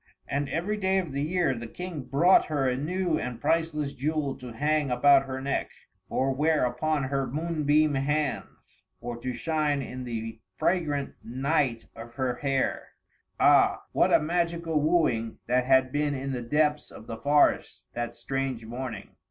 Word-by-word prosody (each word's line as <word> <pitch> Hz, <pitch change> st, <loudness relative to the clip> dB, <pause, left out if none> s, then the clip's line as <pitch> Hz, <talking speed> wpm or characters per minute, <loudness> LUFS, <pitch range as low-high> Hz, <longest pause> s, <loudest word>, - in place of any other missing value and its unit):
And, 140 Hz, 0 st, -2 dB
every 200 Hz, +6 st, -1 dB
day 190 Hz, -1 st, +1 dB
of 180 Hz, -6 st, -1 dB
the 140 Hz, +1 st, -2 dB
year, 165 Hz, -1 st, +1 dB
the 120 Hz, -1 st, -6 dB
King 180 Hz, +3 st, -6 dB
brought 145 Hz, +9 st, +4 dB
her 145 Hz, -4 st, 0 dB
a 125 Hz, -, +1 dB
new 170 Hz, +5 st, -1 dB
and 125 Hz, -2 st, -5 dB
priceless 155 Hz, -3 st, 0 dB
jewel 145 Hz, 0 st, -1 dB
to 125 Hz, -1 st, -9 dB
hang 150 Hz, +3 st, 0 dB
about 135 Hz, +2 st, +5 dB
her 130 Hz, 0 st, -4 dB
neck, 135 Hz, +1 st, -2 dB, 0.4 s
or 135 Hz, +1 st, 0 dB
wear 150 Hz, 0 st, +2 dB
upon 145 Hz, +4 st, -1 dB
her 135 Hz, 0 st, -1 dB
moonbeam 155 Hz, 0 st, +1 dB
hands, 145 Hz, +1 st, -3 dB, 0.2 s
or 120 Hz, 0 st, -5 dB
to 125 Hz, +2 st, -4 dB
shine 150 Hz, +2 st, -1 dB
in 130 Hz, 0 st, -7 dB
the 115 Hz, -2 st, -5 dB, 0.2 s
fragrant 150 Hz, -, 0 dB
night 130 Hz, -1 st, 0 dB
of 115 Hz, +1 st, -10 dB
her 125 Hz, -2 st, -1 dB
hair. 135 Hz, -1 st, -1 dB, 0.5 s
Ah! -, -, +4 dB
what -, -, +3 dB
a -, -, +6 dB
magical 170 Hz, -1 st, 0 dB
wooing 145 Hz, -9 st, +1 dB
that 125 Hz, +1 st, +1 dB
had 130 Hz, 0 st, +4 dB
been 145 Hz, 0 st, 0 dB
in 135 Hz, +1 st, -4 dB
the 125 Hz, -2 st, -3 dB
depths 150 Hz, +4 st, +1 dB
of -, -, -12 dB
the 115 Hz, -, -6 dB
forest, 145 Hz, +4 st, +2 dB
that 120 Hz, 0 st, -4 dB
strange 135 Hz, -4 st, -3 dB
morning! 120 Hz, -3 st, -7 dB
140 Hz, 165 wpm, -27 LUFS, 125-155 Hz, 0.5 s, a